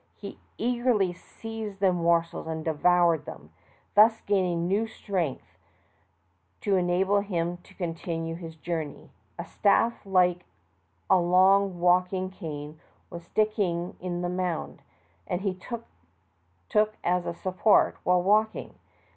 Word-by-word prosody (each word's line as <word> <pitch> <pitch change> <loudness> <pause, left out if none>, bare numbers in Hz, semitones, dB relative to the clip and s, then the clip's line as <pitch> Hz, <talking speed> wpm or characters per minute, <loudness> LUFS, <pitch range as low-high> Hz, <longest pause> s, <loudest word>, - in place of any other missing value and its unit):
He - - -9 0.2
eagerly 240 -6 +1
seized 220 +2 -8
the 190 -2 +3
morsels 170 -1 0
and 160 -1 -4
devoured 170 0 +3
them, 75 +2 -10 0.4
thus 220 +2 +6
gaining 180 -4 0
new 205 +4 +1
strength 185 -9 -4 1.0
to 200 -2 +1
enable 185 +2 +2
him 175 -4 -2
to 175 - -20
con 175 -3 -3
tinue 165 0 -4
his 165 -2 -9
journey. 160 -2 -5 0.3
A - - -5
staff 230 +3 +2
like 180 -3 +2 0.6
a 190 - +5
long 185 +1 +4
walking 180 +1 +2
cane 155 -4 -7 0.3
was 170 -1 -8
sticking 185 -5 -1
in 175 -1 -4
the - - 0
mound, 180 -2 -3 0.5
and 180 - -2
this 195 -3 -1
he 235 -1 -5 0.9
took 215 0 +2
as 180 0 0
a 170 - -3
support 185 +4 +3
while 180 0 +3
walking. 215 +3 +1
180 Hz, 130 wpm, -27 LUFS, 170-200 Hz, 1.0 s, thus